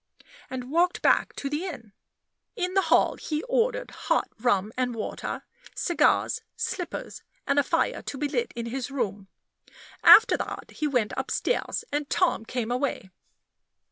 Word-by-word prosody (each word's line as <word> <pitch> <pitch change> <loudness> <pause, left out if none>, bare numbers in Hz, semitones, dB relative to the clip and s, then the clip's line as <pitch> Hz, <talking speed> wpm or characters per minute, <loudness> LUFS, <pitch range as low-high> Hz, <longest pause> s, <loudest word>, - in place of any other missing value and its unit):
and 255 0 -6
walked 350 +3 +2
back - - +4
to 280 - -4
the 295 +4 -2
inn. 230 - -8 0.6
In 365 -4 -2
the 385 - +4
hall - - +4
he 305 -1 -3
ordered - - 0
hot - - 0
rum 215 -3 +1
and 250 -2 -1
water, 220 - -4 0.3
cigars, 345 - +2
slippers, 355 -3 -4 0.2
and 280 0 +3
a - - +4
fire - - 0
to 280 - -6
be 295 +2 -1
lit 475 +11 -1
in 235 -1 -4
his 255 +3 -4
room. 210 -8 -3 0.8
After 450 - +9
that - - -6
he 305 - -2
went 245 -7 0
upstairs, 265 - -1
and 290 0 -2
Tom 355 -11 +1
came 240 -1 -3
away. 250 -7 -2
280 Hz, 150 wpm, -26 LUFS, 240-350 Hz, 0.8 s, After